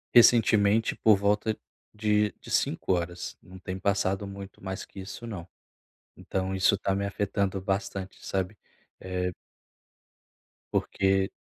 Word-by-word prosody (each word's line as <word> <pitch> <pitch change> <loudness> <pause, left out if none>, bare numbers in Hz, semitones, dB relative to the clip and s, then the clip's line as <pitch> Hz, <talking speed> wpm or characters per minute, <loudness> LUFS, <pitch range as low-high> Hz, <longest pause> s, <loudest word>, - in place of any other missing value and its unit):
Recentemente 110 -2 +6
por 110 -3 +5
volta 105 +2 +1 0.3
de 105 -1 +2
de - - -10
5h 90 -1 0
não 95 +1 -13
tem 95 0 -5
passado 100 0 +1
muito 100 -1 -9
mais 95 -1 -4
que - - -12
isso 95 +5 -7
não. 95 -7 -6 0.7
Então, 95 0 -2
isso 95 +1 +4
tá 95 - 0
me 100 - 0
afetando 100 -1 -1
bastante, 95 0 -3
sabe? 95 +2 -2 0.4
Eh 90 -1 -2 1.4
Porque 95 0 +2
100 Hz, 120 wpm, -28 LUFS, 95-105 Hz, 1.4 s, Recentemente